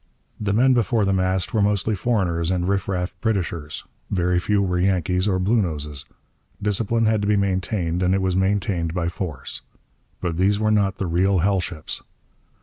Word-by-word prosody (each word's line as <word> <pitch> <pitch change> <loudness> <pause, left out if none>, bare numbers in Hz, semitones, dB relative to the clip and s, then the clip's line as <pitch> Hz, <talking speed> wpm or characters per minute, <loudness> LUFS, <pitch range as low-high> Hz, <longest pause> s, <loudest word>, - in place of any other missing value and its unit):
The 105 -2 -1
men 125 +6 +4
before 115 -2 +2
the 95 - +2
mast 95 0 0
were 110 - +2
mostly 105 +1 +1
foreigners 90 -6 0
and 90 -1 0
riff 100 0 0
raff 90 -1 -2
Britishers; 85 -9 -2 0.3
very 90 -1 +1
few 105 +3 +1
were 90 -2 0
Yankees 90 0 +1
or 95 -2 +2
Bluenoses. 80 - -1 0.5
Discipline 110 +2 0
had 110 -1 +2
to 100 - -1
be 105 0 +3
maintained; 95 -2 0
and 90 +1 +3
it 95 - +1
was 95 -1 +1
maintained 95 -3 0
by 85 -2 0
force. 80 -8 -6 0.6
But 85 -3 -2
these 100 +3 +2
were 110 0 +2
not 100 -2 +2
the 95 - -2
real 95 +3 +2
hell 100 -1 +3
ships. 85 -3 -5
95 Hz, 175 wpm, -23 LUFS, 90-105 Hz, 0.6 s, men